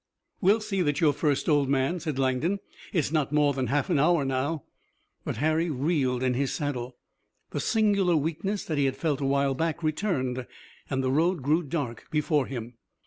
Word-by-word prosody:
"We'll 205 Hz, +4 st, +4 dB
see 200 Hz, -3 st, -1 dB
that 145 Hz, -4 st, +1 dB
you're 155 Hz, -4 st, +4 dB
first 145 Hz, -1 st, 0 dB
old 145 Hz, -4 st, +3 dB
man," 140 Hz, +6 st, +1 dB
said 155 Hz, -5 st, -3 dB
Langdon. 135 Hz, +8 st, +1 dB, 0.3 s
"It's 155 Hz, -6 st, 0 dB
not 155 Hz, -4 st, 0 dB
more 150 Hz, -1 st, +3 dB
than 130 Hz, -2 st, -1 dB
a -, -, -6 dB
half 145 Hz, +4 st, +1 dB
hour 155 Hz, -1 st, +3 dB
now." 135 Hz, +3 st, -1 dB, 0.6 s
But -, -, -4 dB
Harry 160 Hz, +3 st, +1 dB
reeled 135 Hz, -3 st, 0 dB
in 130 Hz, -1 st, +2 dB
his 135 Hz, +2 st, 0 dB
saddle. 130 Hz, -5 st, -3 dB, 0.5 s
The -, -, -2 dB
singular 200 Hz, -5 st, +2 dB
weakness 165 Hz, +7 st, -2 dB
that 155 Hz, -3 st, -1 dB
he 140 Hz, -, +3 dB
had 135 Hz, 0 st, -1 dB
felt 145 Hz, -1 st, -1 dB
a 135 Hz, -, 0 dB
while 140 Hz, 0 st, +2 dB
back 165 Hz, +4 st, -2 dB
returned, 140 Hz, -, -1 dB, 0.4 s
and 135 Hz, -1 st, -1 dB
the 130 Hz, -, +1 dB
road 165 Hz, +2 st, +1 dB
grew 155 Hz, +5 st, +3 dB
dark 140 Hz, -7 st, -4 dB
before 150 Hz, -2 st, +1 dB
him. 120 Hz, -2 st, -7 dB
145 Hz, 190 wpm, -27 LUFS, 135-165 Hz, 0.6 s, We'll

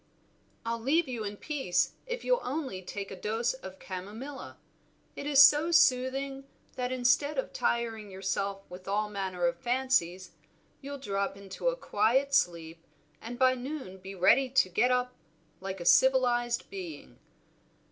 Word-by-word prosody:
"I'll 230 Hz, 0 st, -2 dB
leave 310 Hz, +7 st, +2 dB
you 240 Hz, -4 st, -4 dB
in 205 Hz, 0 st, -5 dB
peace 270 Hz, -, 0 dB, 0.2 s
if 485 Hz, -1 st, -4 dB
you'll -, -, +2 dB
only 265 Hz, -9 st, -4 dB
take 195 Hz, +2 st, -6 dB
a -, -, -5 dB
dose 220 Hz, +5 st, -1 dB
of 190 Hz, -8 st, -10 dB
chamomilla. 210 Hz, +11 st, -8 dB, 0.6 s
It 285 Hz, -, -6 dB
is 285 Hz, -2 st, +4 dB
so 295 Hz, +3 st, +6 dB
soothing, 270 Hz, -2 st, +2 dB, 0.3 s
that 250 Hz, 0 st, -2 dB
instead 255 Hz, +4 st, +2 dB
of 265 Hz, -, -2 dB
tiring 230 Hz, -3 st, -1 dB
yourself 195 Hz, +1 st, -3 dB
with 180 Hz, +1 st, -11 dB
all 210 Hz, +1 st, -1 dB
manner 190 Hz, -3 st, -2 dB
of 170 Hz, 0 st, 0 dB
fancies, 215 Hz, -7 st, 0 dB, 0.5 s
you'll 280 Hz, +1 st, -6 dB
drop 200 Hz, -6 st, -2 dB
into 200 Hz, -, -6 dB
a -, -, +2 dB
quiet 265 Hz, -, +1 dB
sleep, 170 Hz, -9 st, 0 dB, 0.4 s
and 240 Hz, +2 st, -7 dB
by 255 Hz, 0 st, +4 dB
noon 255 Hz, -7 st, -6 dB
be 190 Hz, +1 st, -9 dB
ready 195 Hz, +9 st, +4 dB
to 255 Hz, -7 st, +3 dB
get 235 Hz, +8 st, +2 dB
up 250 Hz, 0 st, +1 dB, 0.5 s
like 190 Hz, 0 st, -5 dB
a 175 Hz, -, -6 dB
civilized 240 Hz, 0 st, +3 dB
being. 175 Hz, -7 st, -8 dB
235 Hz, 150 wpm, -29 LUFS, 195-265 Hz, 0.6 s, so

